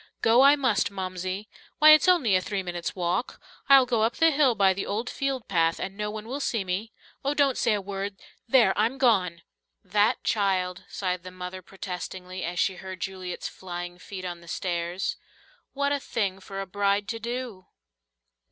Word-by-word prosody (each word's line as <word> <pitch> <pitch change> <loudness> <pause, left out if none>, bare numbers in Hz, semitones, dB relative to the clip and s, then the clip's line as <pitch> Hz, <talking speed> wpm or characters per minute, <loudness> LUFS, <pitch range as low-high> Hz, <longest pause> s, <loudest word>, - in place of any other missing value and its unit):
"Go 230 +3 +6
I 280 +2 +8
must, 255 -10 +1
Momsie. 185 +1 -4 0.3
Why, 310 0 +8
it's 310 +4 +6
only 295 - +4
a 185 - +3
three 195 0 -3
minutes' 175 -1 -4
walk. 180 +6 -2 0.3
I'll 270 -2 +8
go 240 -3 +1
up 225 +2 +1
the 325 0 +4
hill 275 -5 +3
by 195 -2 +4
the 195 - -4
old 220 +4 -2
field 275 -4 -2
path, 165 -4 +2
and 190 +1 -4
no 210 0 -3
one 215 +1 -7
will 270 +4 -4
see 230 -7 -1
me. 190 +5 -3 0.3
Oh, 280 +2 0
don't 280 -3 +3
say 225 - +2
a 205 - -2
word 195 +1 -4 0.3
there, 230 -6 +5
I'm 225 +6 +1
gone!" 185 -10 +2 0.4
"That 210 +4 +2
child!" 185 -4 0
sighed 185 -2 -2
the 185 - -9
mother 185 0 -7
protestingly, 185 0 -7
as 175 +1 -4
she 190 0 +1
heard 185 0 -8
Juliet's 185 -2 -5
flying 175 -1 -7
feet 185 0 -8
on 175 -1 -5
the 170 - -16
stairs. 175 +1 -2 0.6
"What 280 0 0
a 285 - +1
thing 200 -7 -2
for 195 0 -6
a - - -4
bride 200 +1 0
to 230 - -3
do!" 235 -4 -5
195 Hz, 190 wpm, -26 LUFS, 185-235 Hz, 0.6 s, I